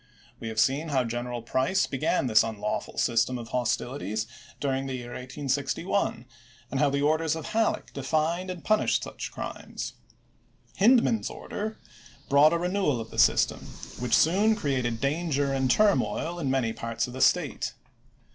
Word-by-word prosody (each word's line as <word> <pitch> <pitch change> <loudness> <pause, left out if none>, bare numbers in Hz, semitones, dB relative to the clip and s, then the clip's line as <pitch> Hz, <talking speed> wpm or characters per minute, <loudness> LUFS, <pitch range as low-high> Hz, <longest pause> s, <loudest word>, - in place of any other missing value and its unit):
We - - -6
have 110 0 -3
seen 140 +7 +2
how 135 -3 +2
General 120 0 -4
Price 130 +11 +1
began 135 0 0
this 110 -4 +5
unlawful 105 -2 -3
system 120 +2 +2
of 115 -1 -8
hostilities 120 -3 -1 0.3
during 135 -1 -1
the 135 - -3
year 120 -1 -7
1861, 135 +4 -2 0.5
and 135 - -1
how 145 -1 +4
the 140 +1 0
orders 155 +1 +2
of 160 - -6
Halleck 225 0 0
defined 160 +6 -1
and 180 -2 -6
punished 215 0 +2
such - - -6
crimes. - - -6 0.8
Hindman's 230 +1 +4
order 215 +1 -5 0.5
brought 145 +2 +6
a 170 - +2
renewal 180 -6 0
of 115 0 -7
the - - -4
system, - - +4 0.4
which 125 -1 +2
soon 205 +7 +4
created 130 - -1
danger 140 0 0
and 135 -1 +1
turmoil 175 -2 +2
in 140 -5 -1
many 130 -4 +1
parts 115 0 -2
of 125 - -9
the 130 - -5
State. - - +2
135 Hz, 155 wpm, -27 LUFS, 120-165 Hz, 0.8 s, brought